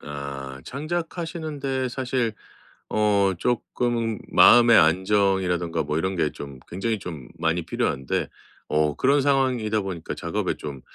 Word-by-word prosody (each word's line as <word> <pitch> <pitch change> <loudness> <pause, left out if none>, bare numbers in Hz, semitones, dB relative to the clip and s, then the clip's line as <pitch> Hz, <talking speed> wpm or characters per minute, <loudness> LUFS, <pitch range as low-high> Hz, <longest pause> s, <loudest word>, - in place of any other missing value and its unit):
아. 70 -2 -7
창작하시는 160 +1 -4
데 130 -2 -1
사실 125 -3 -1 0.6
어 100 -2 +2
쪼끔 120 -1 -1
마음의 120 -1 +7
안정이라든가 90 -1 +2
뭐 75 +1 -1
이런 95 +3 -1
게 75 -3 +1
좀 70 -2 -9
굉장히 110 +5 -2
좀 80 -9 -8
많이 80 +1 0
필요한데. 65 -4 -1 0.4
어 75 -1 +1
그런 140 +2 +3
상황이다 130 -6 +1
보니까 90 -4 -5
작업에 - - -2
좀 70 -3 -7
100 Hz, 275 characters per minute, -24 LUFS, 80-125 Hz, 0.6 s, 마음의